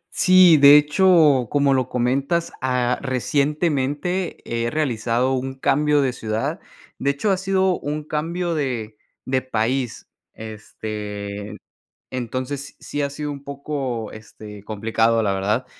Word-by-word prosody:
Sí, 185 -3 +6
de 145 +1 +9
hecho, 150 - +4
como 140 -1 +2
lo 130 -1 0
comentas, 135 +7 0
ah, 125 -1 0
recientemente 145 +5 -1
he 115 0 -2
realizado 125 -3 0
un 130 +1 -3
cambio 145 +2 +2
de 130 -2 0
ciudad. 110 -1 -3 0.4
De 140 - 0
hecho, 170 +9 0
ha 190 - +2
sido 190 -1 +1
un 150 +1 -4
cambio 170 +3 -2
de 120 -8 -3 0.3
de 130 0 0
país, 125 0 -2 0.3
este, 105 -1 -7 0.5
entonces 130 +3 -5
sí 145 - -4
ha 140 - -1
sido 145 +1 -5
un 140 -1 -8
poco, 140 -5 -4
este, 105 -1 -11
complicado, 115 +1 +1
la 100 - +1
verdad. 105 +6 -1
130 Hz, 130 wpm, -22 LUFS, 115-150 Hz, 0.5 s, de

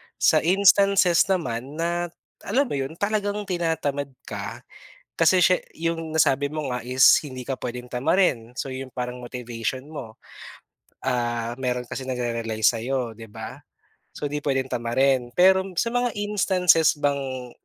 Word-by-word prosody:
sa - - +4
instances 195 0 +4
naman 140 -7 -2
na 170 +2 -1 0.4
alam 255 +8 +3
mo 280 - -8
'yon, 135 +4 -4
talagang 205 +1 -1
tinatamad 160 -6 -1 0.2
ka - - -7 0.6
kasi 180 +2 +5
siya 180 +1 +5 0.2
yung 165 -1 -3
nasabi 145 -2 +3
mo 150 -2 -4
nga 125 -1 -3
is 130 0 0 0.2
hindi 130 -2 -7
ka 135 - -1
puwedeng 125 0 -6
tamarin 125 -3 +1
so, - - -2
yon 130 0 -6
yung - - -50
parang 125 0 -4
motivation 120 +1 -5
mo, 115 -8 -8 0.9
ah, 120 -1 -1
meron 125 -1 -1
kasi 130 - -5
nagre-rely 115 -3 -3
sayo, 120 +1 +1
di 115 - -10
ba? 105 - -9 0.5
So, 145 - -4
di 150 - -2
puwedeng 135 -2 -1
tamarin. 125 +1 +1
Pero 190 +1 +5
sa 230 - +1
mga 245 -1 0
instances 185 -6 +3
bang 135 -3 -2
140 Hz, 145 wpm, -24 LUFS, 125-175 Hz, 0.9 s, kasi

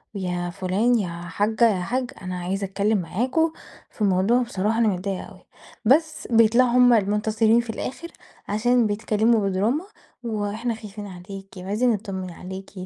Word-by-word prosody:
ويا 180 -2 -2
فُلان، 200 +7 +1
يا 190 -4 -2
حاجّة 205 +7 +1
يا - - -3
حاج، 250 +6 -2
أنا 185 -1 -4
عايزة 190 +3 -2
أتكلّم 200 +3 0
معاكم 250 - 0 0.4
في - - -15
الموضوع، 200 +5 +3
بصراحة 220 -2 -1
أنا 230 - +4
متضايقة 190 -1 -2
أوي. - - -16 0.4
بس 315 +7 +2
بيطلَعوا 230 +2 +5
هُم 245 0 +6
المنتصرين 220 +2 +3
في 235 - -12
الآخر، 265 +8 -5 0.4
عشان 235 +3 +2
بيتكلّموا 215 0 +1
بدراما 220 - 0 0.4
وإحنا 220 +1 -2
خايفين 210 -1 -9
عليكِ، 195 +1 -9
وعايزين 205 +7 0
نتطّمن 195 -4 -4
عليكِ، 190 +3 -9
210 Hz, 145 wpm, -24 LUFS, 190-235 Hz, 0.4 s, هُم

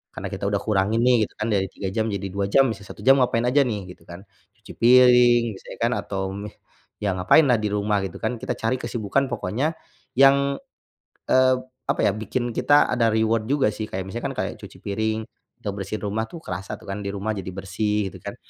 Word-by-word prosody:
Karena - - -5
kita - - -4
udah 100 -1 -1
kurangin 105 +2 +1
nih 125 0 +5
gitu - - -27
kan, 105 - -2
dari 95 -1 +1
3 95 - -5
jam 110 +1 0
jadi 100 -1 -3
2 100 +1 -1
jam, 135 +6 +5
bisa 100 -2 -7
1 - - -11
jam 135 +1 +6
ngapain 120 -2 +2
aja 130 +4 +4
nih? 100 -6 -4
Gitu - - -24
kan. 85 +3 -10 0.3
Cuci - - -12
piring, 125 0 +6
misalnya - - -11
kan 120 - +2
atau, 100 -1 -4
mmm, 100 +1 -6 0.5
ya 100 -2 +1
ngapain 90 - +5
lah 120 -3 +4
di 105 - -1
rumah, 105 0 0
gitu 95 - -7
kan. 115 +1 -1
Kita - - -3
cari 115 +3 0
kesibukan 120 +3 -1
pokoknya, 125 - -2 0.4
yang, 140 +1 +5 0.7
eee, 130 0 +4
p 130 - -13 0.2
apa - - 0
ya, - - +4
bikin 120 +3 -3
kita 145 0 +4
ada 120 -2 +2
reward 110 0 +1
juga 140 -1 +2
sih. 110 - -4
Kayak, 95 0 -3
misalnya 120 +5 -5
kan - - -9
kayak - - -4
cuci - - -11
piring, 110 +2 -1 0.4
atau 100 - -2
bersihin 100 +2 -5
rumah 105 +2 -1
tuh 170 - -8
kerasa 95 +2 -5
tuh - - -16
kan 100 - -4
di - - -2
rumah 100 +2 -2
jadi 95 -3 -6
bersih, 100 +1 -2
gitu - - -12
kan, - - -6
110 Hz, 220 wpm, -23 LUFS, 100-125 Hz, 0.7 s, jam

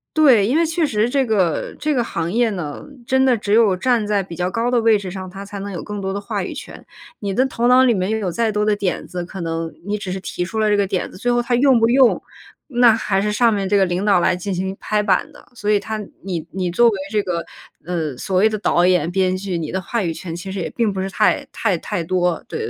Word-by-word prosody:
对， 260 -10 +5
因 265 +7 +2
为 335 - +3
确 330 +1 -1
实 220 -6 +1
这 270 +2 +1
个 200 -9 0
这 305 0 0
个 245 -3 +1
行 170 -6 -3
业 235 +2 +2
呢， 165 -7 -5 0.2
真 265 +2 +2
的 255 -3 +3
只 205 -1 -2
有 215 -4 +4
站 235 +1 +1
在 205 -2 +1
比 175 -2 -9
较 180 +2 -1
高 230 +5 -1
的 245 -2 +3
位 225 -1 +4
置 195 -2 -6
上， 185 0 -6
他 195 +2 -9
才 200 0 -7
能 200 +1 -5
有 175 - -5
更 210 -1 -6
多 190 0 -2
的 200 - -3
话 200 - -3
语 - - -6
权。 - - -9 0.4
你 200 -2 -3
的 260 - +3
头 240 -2 -1
脑 250 +1 +6
里 250 -2 +4
面 185 -2 -1
拥 220 0 0
有 190 -4 -2
再 225 +4 0
多 210 0 0
的 210 -1 +2
点 200 -3 -2
子， 180 -1 -5
可 185 +1 -8
能 165 0 -3
你 210 +1 -2
只 190 -2 -5
是 190 - -3
提 180 -1 -4
出 190 +5 -5
了 215 -1 +2
这 205 - +3
个 200 -1 +1
点 185 -2 -2
子， - - -12
最 245 +3 0
后 240 - +2
他 240 +1 -2
用 260 -1 +4
不 225 - +5
用， 255 0 +4 0.5
那 245 -4 +5
还 195 -3 0
是 210 - 0
上 230 +1 +3
面 200 -2 -1
这 205 - +1
个 195 - +5
领 180 +2 -2
导 200 -4 +4
来 - - +3
进 185 +2 -4
行 190 +1 -3
拍 210 -1 0
板 205 +8 +1
的。 - - -16
所 210 -3 -4
以 210 - +5
他 220 +1 -5 0.2
你 170 -4 -4
你 180 -1 -2
作 240 +7 +4
为 215 -4 +1
这 210 -1 +2
个， 175 -4 -3 0.4
呃， 160 -5 -2
所 185 +8 -2
谓 200 +4 +5
的 215 -1 -2
导 175 -4 +2
演、 180 -2 +2
编 185 0 +1
剧， 185 -2 -3
你 160 -2 -4
的 190 - -2
话 230 +5 -2
语 170 -4 -1
权 165 +1 -7
其 175 +3 -7
实 190 0 -4
也 175 - -3
并 225 -4 0
不 190 - -3
是 190 - -3
太 210 +3 +1
太 200 -6 0
太 195 0 -3
多。 175 0 0
对 - - -5
200 Hz, 300 characters per minute, -20 LUFS, 185-230 Hz, 0.5 s, 脑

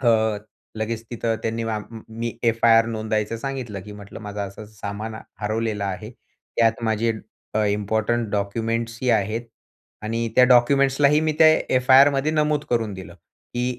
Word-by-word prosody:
अ, 110 -4 +2 0.4
लगेच 110 +1 -3
तिथं 115 -1 -1
त्यांनी 115 +1 -2
आम 105 - -3
म 115 -1 -9 0.2
मी 115 -1 -2 0.2
एफ-आय-आर 115 0 +4
नोंदायचं 110 -1 -2
सांगितलं, 125 -6 -5
की 105 - -10
"म्हटलं 105 +1 -10
माझं 105 0 -6
असं-असं 105 +2 -12
सामान 105 +2 -5 0.3
हरवलेलं 110 -1 -1
आहे. 100 +3 -4
त्यात 115 -1 -2
माझे 110 +1 +1 0.4
अ, 110 0 +2
इम्पोर्टंट 110 +3 0
डॉक्युमेंट्स 115 +3 -2
ही 130 - 0
आहेत 110 +1 +1 0.6
आणि 115 +2 -2
त्या 125 - +8
डॉक्युमेंट्सलाही 135 +3 +4
मी 155 0 +1
त्या 160 - +8 0.3
एफआयआरमध्ये 135 +3 +5
नमूद 150 -1 +1
करून 115 -3 0
दिलं, 95 0 -10
की 120 0 -7
115 Hz, 150 wpm, -23 LUFS, 105-120 Hz, 0.6 s, त्या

